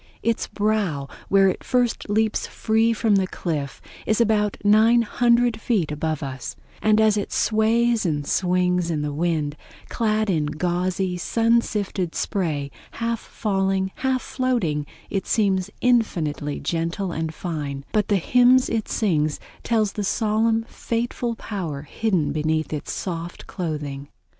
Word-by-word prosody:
Its 230 -1 0
brow, 205 -10 0 0.2
where 195 0 +5
it 185 - -1
first 245 -4 0
leaps 220 +1 +1
free 225 +1 +1
from 220 -2 +2
the 190 -1 +1
cliff, 150 -7 -4 0.3
is 220 - +2
about 210 -3 +2
900 235 +2 +4
feet 195 -12 0
above 155 0 -2
us; 130 -3 -5 0.3
and 215 0 +4
as 215 -1 +4
it 205 - -3
sways 230 +1 +2
and 150 -5 -1
sings 180 0 +1
in 155 -3 -1
the 145 -1 -2
wind, 155 -2 -1 0.3
clad 215 -2 +1
in 160 -6 +1
gauzy, 180 +3 -1
sun 230 +5 +2
sifted 195 -6 -3
spray, 150 -8 -1 0.2
half 230 0 -2
falling, 195 -3 -1
half 260 -1 0
floating, 205 - -1 0.2
it 195 - -2
seems 195 -3 +1
infinitely 160 - +1
gentle 170 +3 -2
and 160 -1 -2
fine; 145 -5 -5
but 210 -1 +1
the 205 - +2
hymns 250 +6 +4
it 225 -2 -1
sings 155 -8 +1 0.2
tell 225 -2 +2
the 205 0 -3
solemn 220 +2 +1
fateful 235 +1 -3
power 170 -11 -5
hidden 180 -1 0
beneath 155 +1 -1
its 150 - -4
soft 170 -1 -5
clothing. 145 -5 -4
195 Hz, 140 wpm, -23 LUFS, 160-225 Hz, 0.3 s, where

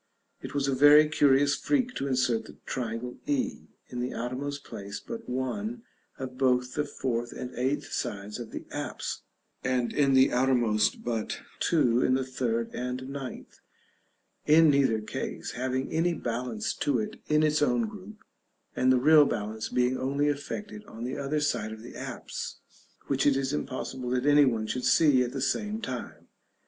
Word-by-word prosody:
It - - -7
was 140 -1 +1
a 135 - +1
very 145 +3 +7
curious 145 -2 +4
freak 255 -4 0
to 140 - -2
insert 125 -4 +1
the - - -13
triangle 120 0 -4
e, 285 -4 -1 0.2
in 125 - -5
the 125 +1 -3
outermost 140 +4 -4
place 100 0 -7
but 230 -1 -8
one 205 - -3 0.3
of 130 -1 -7
both 125 -1 +2
the 150 - 0
fourth 120 -2 -3
and 125 0 -6
eighth 135 +5 -1
sides 100 +3 -4
of 120 -2 -6
the - - -7
apse, - - -4 0.4
and 125 -2 0
in 140 -2 +3
the 130 0 +6
outermost 120 -4 +2
but 115 -3 -3 0.2
two 125 -7 +3
in 130 - +3
the 130 - 0
third 115 -3 -2
and 125 +1 -4
ninth; 135 -2 -7 0.9
in 155 0 +7
neither 135 -6 +3
case 105 - -5
having 130 +1 -2
any 165 +2 +1
balance 120 -4 -3
to 145 -3 0
it 110 - -3
in 150 0 +3
its 150 0 +2
own 235 +8 +2
group, 210 0 -11 0.5
and 130 0 +3
the 130 - +5
real 150 +3 +7
balance 110 -2 -3
being 125 +1 +1
only 140 +3 +1
effected 210 +9 -5
on 115 - -9
the 125 +2 -3
other 140 +2 -1
side 120 -7 -1
of 110 0 -9
the 120 - -10
apse, - - -6 0.5
which 140 +1 +1
it 140 -2 +4
is 135 +1 -1
impossible 130 -3 -4
that 125 +1 0
any 145 0 +6
one 115 -4 0
should 125 +3 -3
see 145 -5 +5
at 125 -1 -1
the 135 - -4
same 210 +7 -1
time. 225 - -6
130 Hz, 175 wpm, -28 LUFS, 125-145 Hz, 0.9 s, very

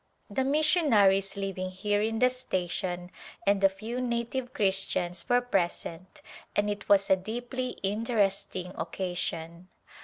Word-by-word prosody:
The 265 +6 +1
missionaries 260 - +4
living 190 -2 -3
here 205 +2 0
in 225 +1 0
the 250 +2 +4
station, 180 -6 -2 0.3
and 200 0 +3
a 195 - +8
few 220 +6 -5
native 245 +1 -2
Christians 185 -4 0
were 245 0 +5
present 185 -5 -2 0.3
and 205 0 +2
it 205 -1 -6
was 200 -1 +5
a - - +8
deeply 245 +6 -4
interesting 195 -3 0
occasion. 175 -2 -4
200 Hz, 125 wpm, -29 LUFS, 185-240 Hz, 0.3 s, a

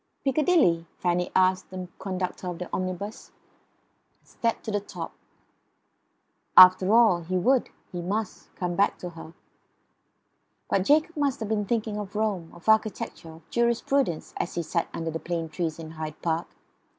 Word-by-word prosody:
"Piccadilly?" 270 - +3
Fanny 180 0 0
asked 185 0 +3
the 185 -1 -6
conductor 185 -1 -4
of 175 -1 -4
the 180 - -5
omnibus, 185 +4 -4 1.0
and - - -25
climbed 230 -1 0
to 220 - -4
the 205 - +1
top. 205 - -7 1.4
After 185 +1 +9
all, 220 -6 +5
he 185 +3 -2
would, 250 +8 +2 0.2
he 175 - -4
must, 205 +3 -3
come 180 -1 -2
back 200 +3 +2
to 180 - -7
her. 165 0 -11 1.4
But 190 -1 +2
Jacob 310 - +3
might 280 -3 +1
have 220 -2 -5
been 210 -2 0
thinking 220 -1 -1
of 205 0 -7
Rome; 205 -6 -1
of 175 +3 -16
architecture; 215 -6 +1
of 160 0 -14
jurisprudence; 235 - 0
as - - -3
he 170 - -1
sat 165 +2 -1
under 165 0 -3
the 165 - -4
plane 165 -1 -3
tree 170 +1 -1
in 160 -1 -8
Hyde 155 -1 -6
Park. 165 0 0
185 Hz, 160 wpm, -26 LUFS, 170-220 Hz, 1.4 s, After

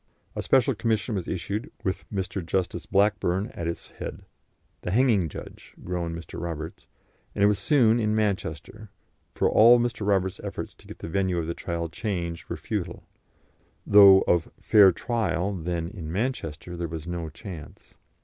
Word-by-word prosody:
A - - -2
Special 135 0 +3
Commission 110 +2 -1
was 95 -4 -3
issued, 95 +6 -3
with 95 - -3
Mr. 95 -2 -3
Justice 85 0 -2
Blackburn 100 0 +1
at 85 - -4
its 85 - -5
head - - -7 0.6
"the - - -4
hanging 105 -5 +3
judge," - - -11
groaned 85 -2 -3
Mr. 85 -1 -8
Roberts 80 -2 -6 0.5
and 100 - +1
it - - +7
was 105 -1 +2
soon 120 -6 +4
in 110 -1 +1
Manchester, 105 -1 -2 0.5
for - - +2
all 120 +2 +7
Mr. 120 -4 -2
Roberts's 95 -2 0
efforts - - -5
to - - -20
get - - -10
the - - -7
venue 95 +1 0
of 85 - -1
the 85 - -2
trial 85 0 -3
changed 85 -1 -4
were - - -3
futile, - - -4 0.8
though 100 -2 +8
of 85 -2 +1
fair 100 -3 +6
trial 100 -3 -1
then 85 -2 -3
in 85 -5 -7
Manchester 90 - -3
there 85 0 -3
was 80 -1 -6
no 85 -2 -4
chance. 85 -1 -10
95 Hz, 165 wpm, -26 LUFS, 85-105 Hz, 0.8 s, though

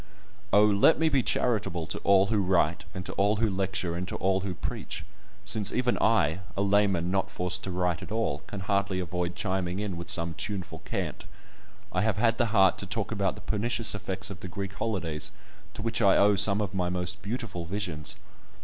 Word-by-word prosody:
Oh! 105 +2 +6
let 105 +8 +5
me 160 0 +2
be 140 -3 +3
charitable 100 -10 0
to - - -5
all 95 -1 +4
who 105 - +3
write, 90 -1 +1
and 90 -2 -6
to - - -5
all 105 +2 +3
who 110 +1 +1
lecture, 95 -3 -1
and 90 +1 -4
to - - -4
all 95 0 +1
who 95 -1 -4
preach, 80 - -5 0.4
since 105 0 +5
even 125 0 +1
I, 95 -7 +3 0.2
a 100 - +2
layman 100 -3 +2
not 95 0 0
forced 90 -1 -1
to - - -4
write 90 -2 -1
at - - -9
all, 115 +1 -1
can 100 - -6
hardly 100 0 0
avoid 90 0 -3
chiming 95 -1 -2
in 100 -4 -3
with 85 +1 -5
some 85 0 +3
tuneful 95 +1 -4
cant! - - -4 0.7
I - - 0
have 110 -1 +1
had 115 +2 +2
the 120 - +3
heart 95 -3 +4
to - - -3
talk - - -2
about - - 0
the - - -11
pernicious 115 +2 +1
effects 95 -1 -3
of 90 - -8
the 95 - -7
Greek 100 +2 -5
holidays, 95 -6 -2 0.5
to 105 - -6
which 115 0 0
I 100 -3 +5
owe 100 0 +5
some 100 +1 +3
of 100 -1 -3
my 90 -2 0
most 90 +1 -2
beautiful 105 -5 -4
visions! 85 -5 -3
95 Hz, 205 wpm, -28 LUFS, 90-105 Hz, 0.7 s, Oh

